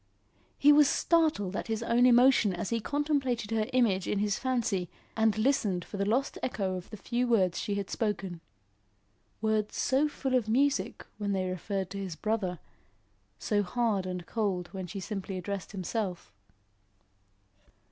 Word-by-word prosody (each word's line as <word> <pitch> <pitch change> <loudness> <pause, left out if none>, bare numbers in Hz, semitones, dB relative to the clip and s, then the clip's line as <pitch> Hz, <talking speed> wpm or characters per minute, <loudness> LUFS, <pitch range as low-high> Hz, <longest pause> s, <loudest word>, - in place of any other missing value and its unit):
He 290 - +6
was 295 -1 +6
startled 310 - +2
at - - -3
his 225 0 -2
own 240 +2 +4
emotion 245 -5 +5
as 175 +4 -4
he 230 - +1
contemplated 270 -4 -1
her 220 -1 +1
image 215 -8 +2
in - - 0
his 205 0 0
fancy 235 -9 -1 0.3
and 220 -1 +2
listened 215 -7 +1
for 205 - -7
the 200 +1 0
lost 255 +5 0
echo 195 -6 -1
of 180 -1 -7
the 215 - -8
few 245 +4 -1
words 190 -7 +2
she 205 -2 -2
had 200 -1 -3
spoken 195 -6 -3 1.0
words 215 -1 0
so 275 +3 +2
full 270 -3 -3
of 240 -4 +2
music 280 +5 +1
when 200 -1 -1
they 185 -1 0
referred 190 +1 -3
to 200 - -5
his 190 -4 -4
brother, 205 -3 -1 0.8
so 205 - +1
hard 205 -2 0
and 180 -1 -4
cold 195 -6 -2
when 190 -2 -5
she 195 +3 -6
simply 195 -1 -4
addressed 190 0 -5
himself. 190 -1 -4
210 Hz, 160 wpm, -30 LUFS, 190-240 Hz, 1.0 s, He